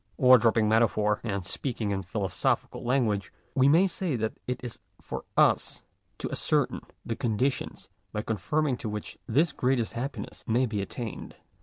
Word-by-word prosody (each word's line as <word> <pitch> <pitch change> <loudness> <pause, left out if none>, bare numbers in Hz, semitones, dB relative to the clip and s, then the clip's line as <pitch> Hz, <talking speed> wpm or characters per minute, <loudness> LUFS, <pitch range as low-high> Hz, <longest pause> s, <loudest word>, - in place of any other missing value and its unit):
Or 130 -2 +8
dropping 115 -1 +3
metaphor, 105 -1 +3
and 100 -5 -2
speaking 110 0 -3
in 95 -1 -1
philosophical 95 +1 -1
lan 125 +1 +2
guage, 100 -3 -1 0.2
we 135 0 +5
may 165 +6 +6
say 180 -5 -1
that 110 -1 -1
it 125 - -2
is 120 -2 -6 0.2
for - - -6
us - - +3 0.3
to - - -4
ascertain - - +1 0.2
the 115 - -2
conditions 125 +2 -1 0.2
by 105 0 -3
conforming 135 +5 0
to 110 - -4
which 105 0 -6
this 145 +7 +3
greatest 125 -4 0
happiness 135 +4 -5
may 120 +3 +3
be 110 -4 -2
at 100 - -5
tained. 115 -5 -6
115 Hz, 165 wpm, -28 LUFS, 105-130 Hz, 0.3 s, Or